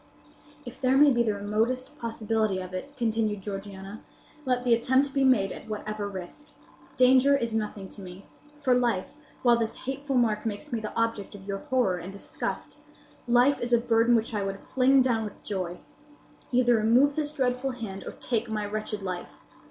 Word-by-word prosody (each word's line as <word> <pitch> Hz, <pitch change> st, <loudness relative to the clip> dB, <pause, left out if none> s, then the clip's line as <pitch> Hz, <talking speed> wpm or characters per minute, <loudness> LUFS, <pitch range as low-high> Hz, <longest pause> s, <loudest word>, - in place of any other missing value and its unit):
"If 245 Hz, +1 st, -10 dB
there 260 Hz, 0 st, +3 dB
be 290 Hz, 0 st, +7 dB
the 215 Hz, -3 st, +1 dB
remotest 225 Hz, +7 st, -1 dB
possibility 220 Hz, -3 st, -1 dB
of 185 Hz, 0 st, -7 dB
it," 280 Hz, +10 st, -6 dB
continued 220 Hz, -4 st, 0 dB
Georgiana, 195 Hz, 0 st, -7 dB, 0.5 s
"let 250 Hz, -1 st, +1 dB
the 245 Hz, -2 st, +4 dB
attempt 260 Hz, +4 st, +2 dB
be 275 Hz, -1 st, +2 dB
made 255 Hz, -7 st, +4 dB
at -, -, -9 dB
whatever 215 Hz, -1 st, -4 dB
risk. 200 Hz, +11 st, -9 dB, 0.4 s
Danger 260 Hz, +2 st, +6 dB
is 235 Hz, -4 st, -2 dB
nothing 210 Hz, -3 st, -3 dB
to 205 Hz, -, -11 dB
me; 185 Hz, +1 st, -10 dB, 0.4 s
for 260 Hz, -3 st, +3 dB
life, 240 Hz, -6 st, 0 dB, 0.3 s
while 240 Hz, -2 st, +5 dB
this 225 Hz, -1 st, -3 dB
hateful 270 Hz, +1 st, -3 dB
mark 220 Hz, -4 st, +2 dB
makes 225 Hz, +6 st, -5 dB
me 230 Hz, -, 0 dB
the 215 Hz, -1 st, -5 dB
object 225 Hz, -3 st, -1 dB
of 195 Hz, -1 st, -12 dB
your 195 Hz, -1 st, -3 dB
horror 250 Hz, -9 st, +1 dB
and 180 Hz, +3 st, -7 dB
disgust,—life 245 Hz, +5 st, -2 dB
is 240 Hz, 0 st, -1 dB
a -, -, +7 dB
burden 230 Hz, 0 st, +3 dB
which 225 Hz, 0 st, 0 dB
I 205 Hz, -2 st, -1 dB
would 195 Hz, 0 st, -4 dB
fling 265 Hz, +1 st, +4 dB
down 235 Hz, -3 st, +1 dB
with 210 Hz, -, -8 dB
joy. 185 Hz, -3 st, -4 dB, 0.7 s
Either 245 Hz, -1 st, +4 dB
remove 245 Hz, +6 st, +4 dB
this 295 Hz, -1 st, -1 dB
dreadful 260 Hz, -2 st, 0 dB
hand, 220 Hz, -7 st, -6 dB
or -, -, -5 dB
take 235 Hz, -1 st, -2 dB
my 215 Hz, -1 st, -2 dB
wretched 210 Hz, 0 st, -4 dB
life! 180 Hz, -2 st, -5 dB
230 Hz, 175 wpm, -27 LUFS, 205-255 Hz, 0.7 s, be